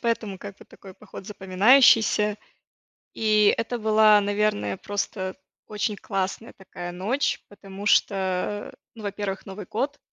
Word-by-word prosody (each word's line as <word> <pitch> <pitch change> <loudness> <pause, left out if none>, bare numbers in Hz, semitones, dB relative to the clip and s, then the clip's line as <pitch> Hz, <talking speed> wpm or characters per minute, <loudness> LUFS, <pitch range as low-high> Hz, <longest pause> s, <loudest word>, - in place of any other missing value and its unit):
поэтому 225 -5 -2
как 200 0 -9
бы - - -16
такой 190 -1 -15
поход 195 -2 -12
запоминающийся. 210 +1 +4 0.8
И 215 -2 +3
это 230 +2 -2
была, 215 -1 +5
наверное, 200 - -1
просто 195 -2 -4 0.3
очень 210 0 -2
классная 195 +2 -4
такая 180 -2 -9
ночь, 210 +11 -1
потому 200 0 -11
что, 205 - +3 0.6
э, - - -17 0.2
ну, 220 - -11
во-первых 200 -1 -4
Новый 195 0 -8
год. 275 +6 -2
205 Hz, 130 wpm, -24 LUFS, 195-215 Hz, 0.8 s, была